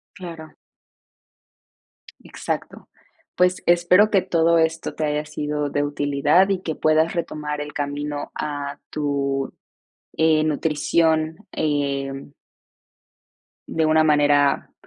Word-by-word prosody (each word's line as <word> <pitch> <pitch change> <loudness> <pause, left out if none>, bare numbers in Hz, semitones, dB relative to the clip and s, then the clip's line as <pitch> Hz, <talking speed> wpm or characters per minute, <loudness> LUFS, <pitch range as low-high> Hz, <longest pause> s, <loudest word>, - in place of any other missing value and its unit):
Claro. 165 -4 -9 1.7
Exacto. - - -6 0.5
Pues 180 0 +2
espero 175 +5 +4
que 195 -3 +3
todo 170 -2 +2
esto 160 0 -1
te 155 - -3
haya 150 0 -1
sido 150 -1 -3
de 145 +1 0
utilidad 145 +5 +2
y 190 -2 0
que 160 -4 -4
puedas 155 +1 +2
retomar 150 -3 -4
el 150 0 -6
camino 145 0 -4
a 145 -1 -4
tu, 140 -2 -2 0.7
eh, 160 -1 +3
nutrición, 155 +1 0
em. 140 -2 -2 1.4
De 160 -1 0
una 155 0 +4
manera, 145 -2 +2
150 Hz, 105 wpm, -22 LUFS, 145-165 Hz, 1.7 s, espero